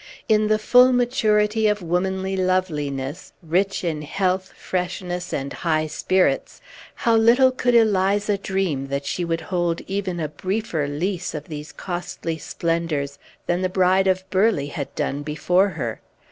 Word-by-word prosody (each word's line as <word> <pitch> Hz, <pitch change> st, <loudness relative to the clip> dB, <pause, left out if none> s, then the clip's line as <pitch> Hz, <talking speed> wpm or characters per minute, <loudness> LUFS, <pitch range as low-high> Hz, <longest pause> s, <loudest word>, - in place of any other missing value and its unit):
In 215 Hz, -1 st, +3 dB
the 215 Hz, 0 st, +3 dB
full 250 Hz, +4 st, +6 dB
maturity 220 Hz, -3 st, +2 dB
of 210 Hz, -2 st, 0 dB
womanly 190 Hz, +3 st, -1 dB
loveliness, 160 Hz, -5 st, -2 dB
rich 190 Hz, +5 st, 0 dB
in 160 Hz, -3 st, -2 dB
health, 185 Hz, +4 st, -1 dB
freshness, 180 Hz, -1 st, -3 dB
and 140 Hz, 0 st, -3 dB
high 155 Hz, -2 st, 0 dB
spirits, 185 Hz, +4 st, 0 dB, 0.4 s
how 230 Hz, -1 st, +2 dB
little 240 Hz, +4 st, +5 dB
could 250 Hz, -1 st, +1 dB
Eliza 205 Hz, -2 st, +3 dB
dream 190 Hz, -9 st, -1 dB
that 140 Hz, +1 st, -3 dB
she 175 Hz, -, -2 dB
would 165 Hz, -1 st, -1 dB
hold 175 Hz, -2 st, -1 dB
even 190 Hz, -3 st, -3 dB
a 155 Hz, -, -1 dB
briefer 175 Hz, 0 st, -2 dB
lease 175 Hz, +5 st, -2 dB
of 150 Hz, +1 st, -7 dB
these 150 Hz, -1 st, -7 dB
costly 175 Hz, -2 st, -5 dB
splendors 155 Hz, -4 st, -2 dB, 0.3 s
than 175 Hz, +1 st, 0 dB
the 185 Hz, -, 0 dB
Bride 185 Hz, +1 st, +3 dB
of 185 Hz, 0 st, +1 dB
Burleigh 190 Hz, -7 st, +2 dB
had 140 Hz, -4 st, -4 dB
done 140 Hz, +1 st, -2 dB
before 180 Hz, +6 st, +2 dB
her. 135 Hz, -, -4 dB
185 Hz, 145 wpm, -23 LUFS, 155-200 Hz, 0.4 s, full